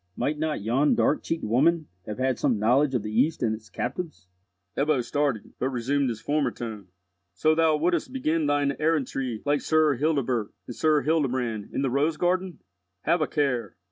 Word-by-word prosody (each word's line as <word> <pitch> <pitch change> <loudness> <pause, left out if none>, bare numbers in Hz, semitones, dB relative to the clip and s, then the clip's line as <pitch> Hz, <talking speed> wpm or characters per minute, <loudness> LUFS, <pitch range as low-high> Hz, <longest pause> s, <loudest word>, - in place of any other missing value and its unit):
Might 150 +1 -1
not 155 -8 -2
yon 130 +7 +2
dark 150 - +2
cheeked 165 - -3
woman 150 +9 +2 0.2
have 105 - -5
had 130 -1 0
some 125 -6 +2
knowledge 130 +6 +3
of 115 - 0
the 105 - -4
East 130 +7 +1
and 110 -2 +1
its 110 -1 -9
captives?" 135 - -5 0.5
Ebbo 140 -3 +1
started, 140 -5 -1
but 130 - 0
resumed 135 +2 0
his 115 -2 -4
former 145 +2 0
tone. 110 -5 -7 0.5
"So 155 +12 +3
thou 160 -1 +3
wouldst 170 +6 0
begin 165 - 0
thine 145 -1 +1
errantry 135 -7 -1
like 145 0 +1
Sir 155 -2 +3
Hildebert 130 -7 0
and 120 - -8
Sir 155 -2 +2
Hildebrand 130 -9 0
in - - -2
the 135 - 0
'Rose 150 +4 +1
garden'? 180 0 -1 0.4
Have 170 -1 +1
a 155 - +2
care. 125 - -1
140 Hz, 180 wpm, -26 LUFS, 120-155 Hz, 0.5 s, knowledge